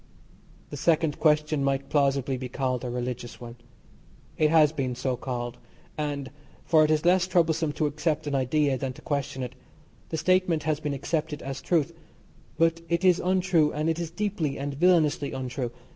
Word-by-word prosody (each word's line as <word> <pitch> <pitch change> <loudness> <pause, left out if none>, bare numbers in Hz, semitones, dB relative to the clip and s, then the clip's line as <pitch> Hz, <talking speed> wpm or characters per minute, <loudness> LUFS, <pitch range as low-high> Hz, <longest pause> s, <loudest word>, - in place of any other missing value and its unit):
The 145 - -5
second 160 0 +1
question 150 -2 +2
might 135 0 0
plausibly 140 -2 +1
be 130 0 -5
called 130 -1 -2
a 125 - -3
religious 120 0 -5
one. 120 0 -9 0.8
It 155 - +3
has 155 -2 +5
been 130 -5 -2
so 130 +1 -1
called, 120 -1 -5 0.4
and, 145 -3 -3 0.3
for 155 -2 +5
it 155 - +2
is 155 +1 +1
less 180 +1 +4
troublesome 165 -3 +2
to 155 - 0
accept 150 +1 -1
an 145 - -3
idea 135 +1 +1
than 130 0 -3
to - - -14
question 140 -2 -2
it, 125 0 -6 0.6
the 160 - -2
statement 180 -1 +2
has 155 -2 0
been 150 -3 -3
accepted 155 +1 -3
as 135 0 -5
truth 165 +1 +1 0.6
but 165 0 +2
it 170 +2 +1
is 180 -1 +5
untrue, 180 -4 +2
and 155 +2 0
it 165 - -3
is 170 -2 -3
deeply 175 -6 -2
and 140 +1 -3
villainously 155 -2 +2
untrue. 130 -1 -3
150 Hz, 175 wpm, -27 LUFS, 135-165 Hz, 0.8 s, has